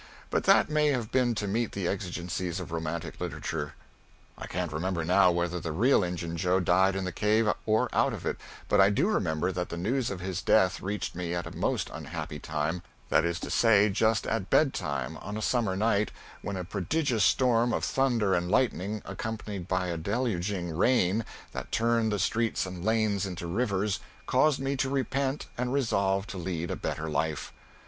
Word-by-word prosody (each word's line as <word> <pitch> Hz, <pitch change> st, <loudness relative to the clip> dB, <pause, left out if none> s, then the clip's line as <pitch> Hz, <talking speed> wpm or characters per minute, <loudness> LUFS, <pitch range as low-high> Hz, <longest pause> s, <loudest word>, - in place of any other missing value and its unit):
But -, -, 0 dB
that -, -, +6 dB
may 150 Hz, 0 st, +2 dB
have 125 Hz, -6 st, 0 dB
been 125 Hz, -3 st, +2 dB
to 105 Hz, -1 st, -2 dB
meet 115 Hz, +3 st, -1 dB
the 95 Hz, -3 st, -2 dB
exigencies 90 Hz, -2 st, -3 dB
of 90 Hz, -2 st, -7 dB
romantic 80 Hz, +1 st, -4 dB
literature. 75 Hz, -2 st, -4 dB, 0.6 s
I -, -, -8 dB
can't 90 Hz, -2 st, -3 dB
remember 85 Hz, +1 st, -1 dB
now 90 Hz, +2 st, +5 dB
whether 85 Hz, 0 st, 0 dB
the 80 Hz, -1 st, -4 dB
real 110 Hz, -, +3 dB
Injun 85 Hz, -1 st, -3 dB
Joe 90 Hz, +3 st, +2 dB
died 95 Hz, +2 st, +3 dB
in 95 Hz, -, -1 dB
the 90 Hz, -, -2 dB
cave 105 Hz, +4 st, +2 dB, 0.2 s
or 110 Hz, 0 st, +3 dB
out -, -, +3 dB
of -, -, -6 dB
it, -, -, -1 dB, 0.3 s
but 105 Hz, -, +4 dB
I 95 Hz, -, +6 dB
do 140 Hz, -, +2 dB
remember 90 Hz, -, 0 dB
that 90 Hz, -1 st, -3 dB
the 85 Hz, -, -5 dB
news 120 Hz, +8 st, 0 dB
of 95 Hz, -, -4 dB
his 95 Hz, +1 st, -3 dB
death 95 Hz, -4 st, +3 dB
reached 100 Hz, +2 st, -3 dB
me 85 Hz, 0 st, -3 dB
at 85 Hz, -, -3 dB
a -, -, -8 dB
most -, -, -1 dB
unhappy -, -, -6 dB
time 80 Hz, +4 st, -2 dB, 0.3 s
that -, -, +4 dB
is 85 Hz, +1 st, -1 dB
to -, -, -5 dB
say, 105 Hz, -3 st, +5 dB
just 110 Hz, +2 st, +2 dB
at 115 Hz, -4 st, -2 dB
bedtime 70 Hz, -, +1 dB
on 105 Hz, -, -6 dB
a -, -, -3 dB
summer 110 Hz, -5 st, +1 dB
night 105 Hz, 0 st, +2 dB, 0.3 s
when 100 Hz, -2 st, -4 dB
a 90 Hz, -, -3 dB
prodigious 115 Hz, -, 0 dB
storm 120 Hz, -2 st, +3 dB
of -, -, -1 dB
thunder 120 Hz, -7 st, +2 dB
and 90 Hz, -1 st, 0 dB
lightning 105 Hz, -3 st, 0 dB
accompanied 100 Hz, -2 st, -5 dB
by 90 Hz, 0 st, 0 dB
a 85 Hz, -, -2 dB
deluging 95 Hz, -4 st, -1 dB
rain 110 Hz, +1 st, +3 dB, 0.3 s
that -, -, -6 dB
turned 115 Hz, -1 st, +2 dB
the 105 Hz, -, 0 dB
streets 110 Hz, +4 st, 0 dB
and 90 Hz, -2 st, -7 dB
lanes 110 Hz, -2 st, +1 dB
into 90 Hz, -2 st, -5 dB
rivers, 100 Hz, +1 st, 0 dB, 0.3 s
caused 135 Hz, +2 st, +3 dB
me 135 Hz, +1 st, -1 dB
to 135 Hz, 0 st, 0 dB
repent 135 Hz, +1 st, -1 dB
and 125 Hz, 0 st, 0 dB
resolve 100 Hz, -7 st, +1 dB
to 95 Hz, -, -7 dB
lead 85 Hz, -1 st, -3 dB
a -, -, -1 dB
better 80 Hz, +1 st, -3 dB
life. 80 Hz, 0 st, -2 dB
95 Hz, 190 wpm, -29 LUFS, 90-115 Hz, 0.6 s, that